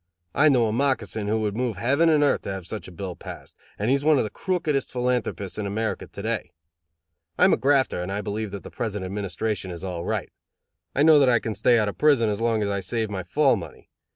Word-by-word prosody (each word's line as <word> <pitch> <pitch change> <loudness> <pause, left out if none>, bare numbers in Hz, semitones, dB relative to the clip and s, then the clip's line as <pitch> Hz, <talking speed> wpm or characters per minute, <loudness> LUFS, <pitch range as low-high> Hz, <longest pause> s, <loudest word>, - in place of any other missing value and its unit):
I 155 +3 +5
know 125 -5 +4
a 110 - -1
moccasin 115 -5 0
who 110 +1 0
would 105 -1 -1
move 120 -2 -2
heaven 140 +10 +3
and 150 -2 +4
earth 145 - +2
to - - -5
have 95 -2 -6
such 105 +4 -6
a - - -10
bill 90 +1 -6
passed, - - -10 0.2
and 105 - -2
he - - +5
is 140 0 +1
one 155 -1 +4
of - - +2
the 105 - -5
crookedest 160 -7 -1
philanthropists 125 -6 -2
in 105 - -2
America 110 +3 -2
to - - -9
day. - - -2 0.8
I - - +5
am - - +5
a - - +3
grafter, 135 -9 +2
and 90 +2 -4
I 100 +1 -2
believe 105 +1 -3
that 100 0 -7
the - - -10
present 105 -5 -3
administration 100 0 -3
is 85 0 -7
all 90 -3 -4
right. - - -3 0.6
I 140 - +3
know 155 -1 +7
that 135 -2 +5
I 120 - +5
can 110 -1 -3
stay 120 +2 +3
out 110 -2 +2
of 100 - -5
prison 140 -7 +4
as 105 +1 -2
long 115 -2 +1
as 100 - -1
I 100 - -1
save 110 +3 -2
my 95 -2 -3
fall 135 - +2
money. 95 -6 -10
110 Hz, 250 wpm, -25 LUFS, 100-130 Hz, 0.8 s, know